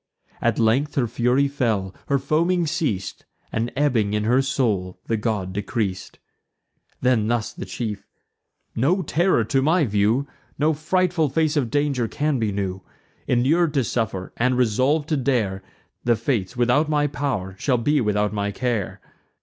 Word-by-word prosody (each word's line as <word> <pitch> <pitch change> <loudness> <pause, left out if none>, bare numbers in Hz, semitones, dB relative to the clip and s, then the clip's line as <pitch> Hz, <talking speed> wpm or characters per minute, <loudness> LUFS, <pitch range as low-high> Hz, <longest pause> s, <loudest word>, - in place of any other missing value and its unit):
At - - +1
length 125 +7 +2
her 130 - +2
fury 125 +4 +2
fell, 110 -9 -1
her 140 - +2
foaming 170 +5 +1
ceas'd, 105 - -2 0.3
And, 115 +1 -1
ebbing 125 -8 +1
in 105 - 0
her 125 +5 +3
soul, 110 -9 -1
the 115 - 0
god 105 -4 -2
decreas'd. 100 -2 -3 0.8
Then 125 -4 +2
thus 120 -1 -1
the - - -7
chief: 105 -4 -5 0.7
"No 175 +11 +2
terror 170 -5 +2
to 135 +5 +1
my 160 +3 +3
view, 110 +5 +1 0.3
No 155 +2 +2
frightful 165 +1 +1
face 155 +2 +1
of 135 -6 +1
danger 145 -4 0
can 145 +2 -1
be 110 -2 0
new. 95 -1 -3 0.5
Inur'd 150 +6 +2
to 135 - +3
suffer, 110 -5 -3
and 125 +1 +2
resolv'd 130 +6 +2
to 155 - +1
dare, 115 -8 0 0.4
The 120 -1 +3
Fates, 115 -1 -2
without 125 +6 +2
my 150 -1 +2
pow'r, 135 -10 -2
shall 130 -4 +1
be 145 +5 +2
without 105 -1 0
my 100 -1 -1
care. 115 -2 -2
125 Hz, 155 wpm, -23 LUFS, 105-145 Hz, 0.8 s, her